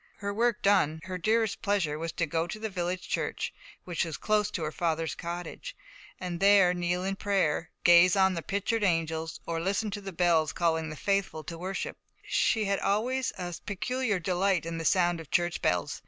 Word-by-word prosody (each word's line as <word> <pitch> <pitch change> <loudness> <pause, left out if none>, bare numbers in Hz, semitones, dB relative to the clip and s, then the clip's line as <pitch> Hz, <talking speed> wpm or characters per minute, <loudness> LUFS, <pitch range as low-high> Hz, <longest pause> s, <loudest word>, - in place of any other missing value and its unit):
Her 200 -1 -3
work 230 +1 +1
done, 185 -6 +3
her 185 0 -5
dearest 220 +3 +1
pleasure 180 -7 0
was 165 0 -3
to 170 - 0
go 165 +1 -1
to 215 - -5
the 220 0 -4
village 180 0 -3
church, - - -2 0.3
which 175 -3 -1
was 165 -2 -4
close 210 -1 +1
to 170 - -4
her 155 - -2
father's 165 -1 -1
cottage, 175 - -6 0.4
and 180 -2 -4
there 195 -2 +6
kneel 175 0 -1
in 195 +1 -1
prayer, 190 -6 0
gaze 175 +1 +7
on 190 -1 +4
the 170 - -3
pictured 205 +5 -1
angels, 165 -3 -1
or 165 -1 -2
listen 200 +4 -1
to 205 - -5
the 195 -1 -6
bells 165 -3 +2
calling 160 -2 0
the 155 - -6
faithful 195 -2 -1
to 170 - -7
worship: 185 +3 -4 0.3
she 220 -2 +2
had 200 0 0
always 245 +6 0
a 175 -1 -4
peculiar 225 +2 -1
delight 180 0 +1
in 165 0 -4
the 165 - -4
sound 175 -2 +3
of 160 - -10
church 175 0 0
bells. 90 -1 0
180 Hz, 195 wpm, -29 LUFS, 165-200 Hz, 0.4 s, gaze